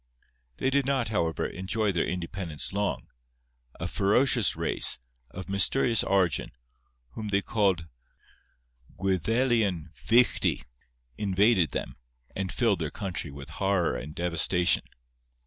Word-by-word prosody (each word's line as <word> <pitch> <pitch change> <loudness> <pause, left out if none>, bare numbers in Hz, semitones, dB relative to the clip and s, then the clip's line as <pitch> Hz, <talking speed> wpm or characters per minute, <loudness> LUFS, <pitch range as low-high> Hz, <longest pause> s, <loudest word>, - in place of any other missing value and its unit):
They 130 - 0
did 140 -1 +1
not, 135 -5 0
however, 85 -7 -1
enjoy 100 +4 -2
their 85 - 0
independence 90 -2 -4
long; 95 -11 -2 0.7
a - - -3
ferocious 110 +2 +2
race, - - +4 0.3
of 90 +7 -8
mysterious 105 +4 +3
origin, 95 -7 0 0.6
whom 105 - -6
they 100 -1 0
called 95 -7 +1 1.1
Gwyddelian 95 - 0
Fichti, 120 +2 +2 0.6
invaded 100 - +3
them, - - -5 0.4
and 95 -1 -3
filled 110 -7 +1
their 80 -3 -2
country 95 -4 -5
with 70 +2 -10
horror 95 -8 +1
and 70 +5 -7
devastation. 90 +1 +2
95 Hz, 115 wpm, -27 LUFS, 85-110 Hz, 1.1 s, race